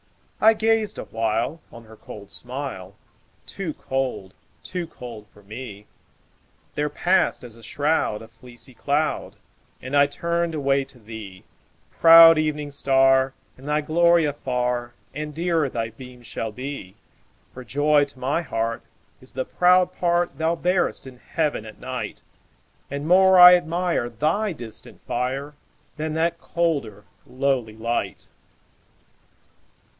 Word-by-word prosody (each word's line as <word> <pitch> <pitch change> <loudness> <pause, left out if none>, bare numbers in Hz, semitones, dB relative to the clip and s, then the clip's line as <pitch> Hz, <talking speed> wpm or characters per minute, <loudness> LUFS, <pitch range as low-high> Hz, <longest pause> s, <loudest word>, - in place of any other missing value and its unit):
I 220 +1 +7
gazed 220 -1 +1
awhile 115 +8 -2
On 115 - -12
her 110 0 -15
cold 100 -2 -12
smile; 125 -7 -6 0.5
Too 180 -6 -5
cold—too 135 - -5
cold 115 -8 -10
for 105 - -20
me— 105 -1 -9 0.9
There 150 0 -1
passed, 180 +3 +1
as 120 -3 -9
a 115 - -16
shroud, 145 -3 -1
A - - -12
fleecy 120 +2 -11
cloud, 145 +5 -1 0.4
And 130 +3 -5
I 140 0 +6
turned 170 +2 -2
away 140 -2 +1
to 135 -1 -16
thee, 105 -4 -10 0.5
Proud 165 -1 +8
Evening 150 -1 -2
Star, 135 -1 +3 0.2
In 135 - -12
thy 150 +1 +1
glory 170 +2 +3
afar 125 -4 -2 0.2
And 150 +1 -6
dearer 165 -3 0
thy 115 -2 -3
beam 125 +1 -13
shall 115 -1 -5
be; 130 -5 -7 0.6
For 130 - -9
joy 145 +2 +2
to 140 - -12
my 135 +6 -1
heart 115 -6 -3 0.4
Is 130 - -15
the 130 - -3
proud 180 0 +3
part 175 -3 0
Thou 160 +1 +1
bearest 180 -1 0
in 130 -2 -12
Heaven 150 -7 -2
at 110 -1 -12
night, 130 - -6 0.7
And 140 +2 -4
more 190 +1 +6
I 180 0 +11
admire 170 -6 -1
Thy 160 - 0
distant 120 -7 -10
fire, 135 +4 -3 0.4
Than 155 0 -3
that 170 +1 0
colder, 140 -12 -2 0.2
lowly 130 -4 -1
light. 115 +1 -3
140 Hz, 130 wpm, -23 LUFS, 120-165 Hz, 0.9 s, I